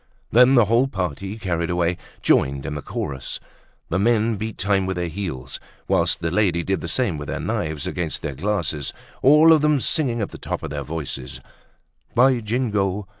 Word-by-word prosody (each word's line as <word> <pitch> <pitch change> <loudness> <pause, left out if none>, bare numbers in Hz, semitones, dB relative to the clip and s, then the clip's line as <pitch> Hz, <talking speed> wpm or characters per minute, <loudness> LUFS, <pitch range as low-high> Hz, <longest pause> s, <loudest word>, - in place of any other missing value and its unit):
Then 125 +3 +6
the 120 -3 +6
whole 115 +5 +3
party, 95 - -4
carried 85 -5 -2
away, 85 0 +1 0.3
joined 70 0 +2
in - - -3
the 75 - -4
chorus. 65 -3 -4 0.5
The 95 - 0
men 115 +1 +2
beat 110 +1 -5
time 95 -1 +1
with 95 -1 -2
their 90 -1 -1
heels, 80 -8 -5 0.3
whilst - - +1
the 80 - -1
ladies 90 -3 +1
did 95 0 0
the - - -4
same 105 - 0
with 75 - -6
their - - -3
knives 75 -2 -2
against 85 -3 -3
their 75 -3 -3
glasses. 85 -3 -2 0.3
All 150 +4 +7
of 155 - +4
them 150 -1 +3
singing 130 -4 0
at 105 - -2
the - - -10
top - - -4
of - - -5
their - - -3
voices: 75 -5 -5 0.8
"By 125 +1 +5
Jingo! 105 -4 -1
95 Hz, 185 wpm, -22 LUFS, 80-115 Hz, 0.8 s, All